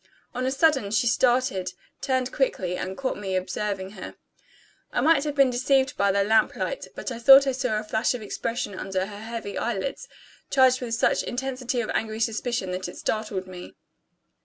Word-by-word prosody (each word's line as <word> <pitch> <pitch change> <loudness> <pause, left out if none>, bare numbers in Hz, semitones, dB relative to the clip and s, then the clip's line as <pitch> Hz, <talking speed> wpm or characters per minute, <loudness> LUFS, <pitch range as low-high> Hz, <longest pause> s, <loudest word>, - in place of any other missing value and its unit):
On 255 +1 -2
a - - +1
sudden, 270 -6 +2
she 215 +3 +1
started, 240 -7 +1 0.3
turned 260 -2 0
quickly, 185 -10 -1
and 190 +1 -5
caught 260 -5 -2
me 190 -2 -3
observing 190 +1 -3
her. 215 - -9 0.8
I - - 0
might 315 -3 +4
have 295 -1 -2
been 275 -3 +4
deceived 265 +1 +2
by 200 0 +2
the 200 0 +2
lamp 220 +1 +3
light; - - -3
but - - -5
I 235 - -5
thought 270 +3 +8
I 270 - +1
saw 250 -4 -1
a 215 - -3
flash 220 +3 0
of 245 - -6
expression 230 0 -3
under 190 0 -2
her 205 0 -9
heavy 220 -2 -5
eyelids, 240 - -3 0.4
charged 260 -1 +4
with 235 -2 -2
such 230 - +2
intensity 255 -1 -3
of 220 - -3
angry 220 0 -2
suspicion 225 -3 -1
that 185 +1 -3
it - - -9
startled 210 -4 -2
me. 180 -1 -10
230 Hz, 185 wpm, -25 LUFS, 200-260 Hz, 0.8 s, thought